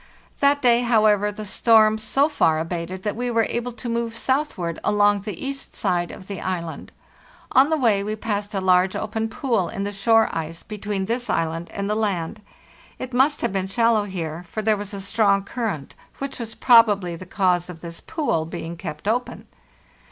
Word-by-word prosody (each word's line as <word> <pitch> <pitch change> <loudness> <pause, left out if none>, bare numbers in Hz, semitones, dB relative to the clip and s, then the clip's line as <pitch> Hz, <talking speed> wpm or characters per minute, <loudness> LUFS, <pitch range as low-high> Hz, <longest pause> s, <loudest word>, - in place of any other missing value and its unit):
That 285 0 +3
day, 240 -1 +5
however, 215 -3 +3
the 210 +1 -7
storm 220 +1 +4
so 270 +6 +2
far 165 - +2
abated 170 +3 -4
that 210 - -2
we 245 +2 -2
were 230 -1 +2
able 240 +1 -3
to 240 - -8
move 230 -1 -2
southward 245 - -1
along 205 0 +3
the 210 +2 -6
east 275 0 -5
side 175 -1 0
of 185 - -10
the 195 -2 -6
island. 170 -3 -4 0.6
On 270 +3 +5
the 320 - +2
way 220 -7 +2
we 215 +1 -3
passed 210 -1 -3
a 195 - 0
large 185 0 +3
open 220 +1 -2
pool 225 - 0
in 195 - -4
the 205 - -2
shore 225 +3 +3
ice 165 +1 -5
between 205 -2 -4
this 240 +3 -2
island 165 +1 -1
and 200 0 -3
the 210 - 0
land. 205 -3 -2 0.6
It 255 -1 -7
must 275 +4 +3
have - - -1
been 190 -1 -1
shallow 230 +1 +2
here, 170 -4 -5
for 215 - -4
there 215 0 +3
was 205 -1 -6
a 200 -1 -6
strong 200 0 +2
current, 200 - -4 0.2
which 275 -1 -5
was 225 -1 -6
probably 210 -8 +5
the 185 +2 -10
cause 180 -2 +1
of 165 -2 -9
this 170 -1 -8
pool 275 - -1
being 170 0 -6
kept 155 +2 -7
open. 245 +3 -1
205 Hz, 190 wpm, -23 LUFS, 185-230 Hz, 0.6 s, day